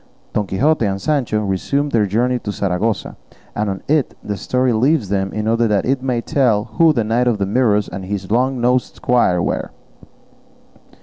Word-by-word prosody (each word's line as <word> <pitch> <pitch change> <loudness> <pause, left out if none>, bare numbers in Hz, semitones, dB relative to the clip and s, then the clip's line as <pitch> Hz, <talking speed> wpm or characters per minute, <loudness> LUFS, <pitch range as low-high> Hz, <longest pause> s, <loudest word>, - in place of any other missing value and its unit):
Don 105 -2 -1
Quixote 140 +9 +1
and 95 0 -2
Sancho 120 -4 0
resumed 140 +10 -1
their 110 -4 +2
journey 120 +5 +1
to 105 - -4
Saragossa, 100 +2 -2 0.4
and 105 0 -1
on 95 -1 -5
it 150 -3 +1
the 105 - -3
history 125 +5 0
leaves 125 -1 +1
them 95 -1 -1
in 110 0 -3
order 115 +1 +2
that 105 -3 +1
it 130 0 0
may 125 -3 -1
tell 115 -6 +1
who 165 +8 +3
the 120 -7 0
Knight 115 +3 +1
of 120 -3 +2
the 100 - -1
Mirrors 105 -1 +2
and 95 +1 -7
his 95 0 -5
long 130 +3 +1
nosed 125 +1 +1
squire 90 -8 +2
were. - - -2
115 Hz, 185 wpm, -18 LUFS, 100-125 Hz, 0.4 s, who